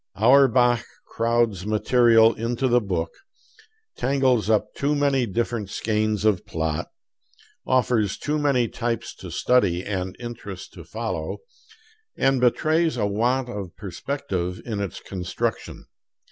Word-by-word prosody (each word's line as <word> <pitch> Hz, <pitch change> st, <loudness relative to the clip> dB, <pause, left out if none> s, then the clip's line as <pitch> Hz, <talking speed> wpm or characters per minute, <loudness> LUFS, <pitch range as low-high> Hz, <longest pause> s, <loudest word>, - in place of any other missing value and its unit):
Auerbach 120 Hz, +1 st, +4 dB, 0.2 s
crowds 115 Hz, -4 st, 0 dB
material 115 Hz, +1 st, +4 dB
into 115 Hz, +4 st, -1 dB
the 120 Hz, 0 st, +3 dB
book, 90 Hz, -5 st, -2 dB, 0.8 s
tangles 130 Hz, -4 st, +1 dB
up 110 Hz, -2 st, +1 dB
too 145 Hz, +2 st, 0 dB
many 140 Hz, -4 st, +2 dB
different 115 Hz, 0 st, -2 dB
skeins 110 Hz, -1 st, -1 dB
of 105 Hz, -4 st, +2 dB
plot, 80 Hz, -2 st, -3 dB, 0.8 s
offers 120 Hz, -5 st, +2 dB
too 150 Hz, +1 st, -1 dB
many 135 Hz, -5 st, +2 dB
types 115 Hz, 0 st, -3 dB
to -, -, -9 dB
study 100 Hz, -8 st, +2 dB
and 95 Hz, -2 st, -3 dB
interests 105 Hz, -6 st, -7 dB
to -, -, -12 dB
follow, -, -, -4 dB, 0.8 s
and 135 Hz, -1 st, +2 dB
betrays 155 Hz, +5 st, +2 dB
a 105 Hz, -, +1 dB
want 120 Hz, +6 st, 0 dB
of 100 Hz, -7 st, -6 dB
perspective 95 Hz, -2 st, -4 dB
in 110 Hz, -4 st, -3 dB
its 100 Hz, -4 st, -4 dB
construction. 90 Hz, -3 st, -4 dB
115 Hz, 120 wpm, -24 LUFS, 100-125 Hz, 0.8 s, Auerbach